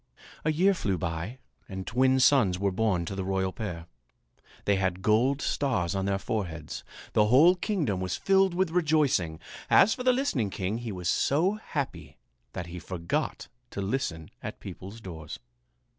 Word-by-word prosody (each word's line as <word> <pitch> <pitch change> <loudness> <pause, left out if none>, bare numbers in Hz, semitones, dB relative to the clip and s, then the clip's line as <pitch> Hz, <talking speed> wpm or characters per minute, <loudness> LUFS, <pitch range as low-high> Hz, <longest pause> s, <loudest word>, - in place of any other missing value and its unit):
A 155 - +2
year 185 +6 +4
flew 100 - -1
by 85 +6 -4 0.3
and 95 -1 -5
twin 130 +3 +3
sons 125 -9 +4
were 100 +1 0
born 95 -4 +1
to 95 - -5
the 95 -1 -3
royal 95 0 -1
pair. 85 -7 -5 0.8
They 100 -1 +3
had 95 -1 -1
gold 120 +7 +3
stars 115 - 0
on 95 -1 -1
their 100 0 +1
foreheads. 85 -7 -4 0.3
The 105 - +4
whole 145 +10 +7
kingdom 175 - -1
was 95 -1 -2
filled 195 -2 +3
with 185 -2 +1
rejoicing. 150 - +2 0.3
As 220 - +6
for - - -6
the 255 0 +4
listening 245 - 0
king, 95 +4 -2
he 120 -2 -5
was 90 -3 -4
so 155 - +2
happy 155 - -5 0.4
that 90 - -4
he 85 +1 -7
forgot 85 0 -3 0.2
to - - -7
listen 95 - -3
at - - -6
people's 100 +5 -9
doors. 80 -6 -7
105 Hz, 165 wpm, -28 LUFS, 95-145 Hz, 0.8 s, whole